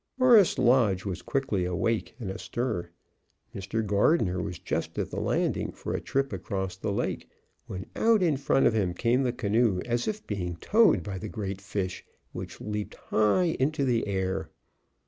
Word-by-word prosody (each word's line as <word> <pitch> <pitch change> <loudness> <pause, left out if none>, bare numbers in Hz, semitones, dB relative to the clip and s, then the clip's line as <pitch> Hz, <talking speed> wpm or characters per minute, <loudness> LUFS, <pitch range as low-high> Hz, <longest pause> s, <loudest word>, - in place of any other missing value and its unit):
Forest 240 -7 +6
Lodge 120 -7 +3
was 95 -4 -3
quickly 135 -9 -1
awake 105 +6 -1
and 105 -6 -4
astir. 110 -2 -3 0.6
Mr. 100 +3 -3
Gardner 100 - +2
was 90 -2 -4
just - - -3
at - - -2
the - - -3
landing - - 0
for - - -5
a - - -2
trip 135 0 -1
across 95 -3 -3
the 100 +2 -3
lake, - - -2 0.4
when 95 0 -6
out 225 -3 +4
in 160 -5 +3
front 135 0 +2
of - - +4
him 95 -5 0
came 120 +6 +2
the 125 -2 +1
canoe 110 -3 +1
as 120 0 -1
if 215 0 -3
being 90 -4 -3
towed 200 - +4
by 95 +1 -5
the 105 - -6
great 100 -3 -4
fish, 100 -2 -3 0.3
which - - -7
leaped 105 -1 -4
high 135 - +2
into 140 +2 +1
the 120 -4 +1
air. 95 -1 -2
105 Hz, 170 wpm, -28 LUFS, 95-130 Hz, 0.6 s, Forest